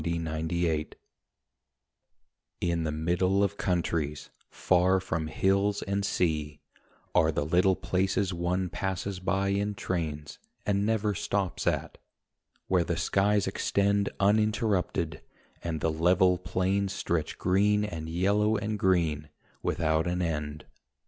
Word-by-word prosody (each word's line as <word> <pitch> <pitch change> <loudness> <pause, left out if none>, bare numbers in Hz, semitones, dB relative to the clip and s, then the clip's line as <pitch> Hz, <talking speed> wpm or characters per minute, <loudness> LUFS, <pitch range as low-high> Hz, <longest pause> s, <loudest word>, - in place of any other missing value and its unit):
OUT - - -4
OF 80 -1 -2
THE 85 +1 0
WINDOW 75 -1 -1 1.7
In 85 -2 0
the 75 - -1
middle 90 +5 +1
of 100 0 0
countries, 80 -5 -1 0.2
far 95 +1 +2
from 80 -4 -3
hills 100 +4 +1
and 100 +1 -1
sea, 75 -6 -1 0.5
Are 80 0 +4
the 75 -1 -1
little 90 +4 +3
places 95 +1 0
one 90 +2 -1
passes 95 0 -3
by 95 +1 0
in 100 +1 0
trains 75 -6 -4 0.3
And 100 0 +1
never 110 -2 +1
stops 95 -1 -2
at; - - -1 0.7
where 90 -2 +3
the 85 0 -2
skies 100 +3 +2
extend 100 +1 +1
Uninterrupted, 105 -5 +1 0.4
and 80 -3 -3
the 80 - +1
level 90 +3 +3
plains 95 +2 0
Stretch 85 -5 -2
green 105 +3 +2
and 80 -5 -5
yellow 100 +5 +2
and 105 +1 -3
green 80 -6 +1 0.3
without 80 0 0
an 90 +1 0
end. 75 -2 -3
90 Hz, 130 wpm, -28 LUFS, 80-100 Hz, 1.7 s, Are